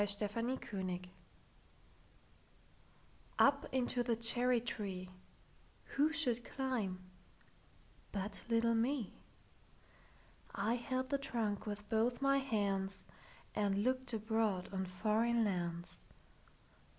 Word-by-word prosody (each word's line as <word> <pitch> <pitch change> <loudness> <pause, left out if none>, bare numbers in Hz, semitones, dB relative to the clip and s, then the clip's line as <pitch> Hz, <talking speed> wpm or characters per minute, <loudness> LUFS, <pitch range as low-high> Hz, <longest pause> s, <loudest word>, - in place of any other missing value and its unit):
Foreign 210 +5 +1
Lands 180 -2 -3 2.3
UP 280 0 +5
into 250 -1 +2
the 240 -1 +1
cherry 240 +2 +4
treeWho 200 +7 -4
should 250 -7 +1
climb 235 -11 -2 1.1
but 200 0 -3
little 230 0 +3
me?I 230 -2 -5
held 255 +2 -2
the 280 - +2
trunk 225 -7 -2
with 210 0 -5
both 230 +2 +2
my 275 0 +4
handsAnd 200 -6 0 0.8
looked 255 +1 0
abroad 220 -4 0
on 190 0 -1
foreign 220 +5 +2
lands. 175 -3 -2
225 Hz, 85 wpm, -37 LUFS, 200-250 Hz, 2.3 s, UP